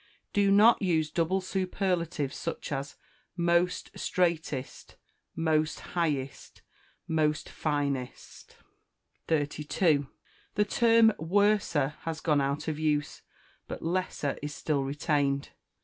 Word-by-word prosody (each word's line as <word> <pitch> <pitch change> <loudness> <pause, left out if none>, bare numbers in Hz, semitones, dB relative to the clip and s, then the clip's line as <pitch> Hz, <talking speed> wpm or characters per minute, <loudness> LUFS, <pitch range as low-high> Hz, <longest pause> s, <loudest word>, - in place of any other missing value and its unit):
Do 200 -1 +3
not 210 +4 +6
use 160 -5 +1
double 175 +4 +1
superlatives, 180 -6 -1
such - - -5
as 140 0 -4 0.4
most 170 +1 +1
straightest, 160 -7 -2 0.4
most 155 -2 +1
highest, 145 -6 -2 0.4
most 155 -2 0
finest. 140 -4 -3 0.7
32. 150 0 +1 0.5
The 210 - +3
term 230 0 +5
worser 175 -5 +2
has 165 -1 -4
gone 150 -3 +2
out 140 +3 -2
of 155 -1 -2
use; 150 -2 -1 0.5
but - - -6
lesser 165 -4 -2
is 145 0 -5
still 145 -3 -1
retained. 140 0 0
160 Hz, 100 wpm, -29 LUFS, 145-180 Hz, 0.7 s, not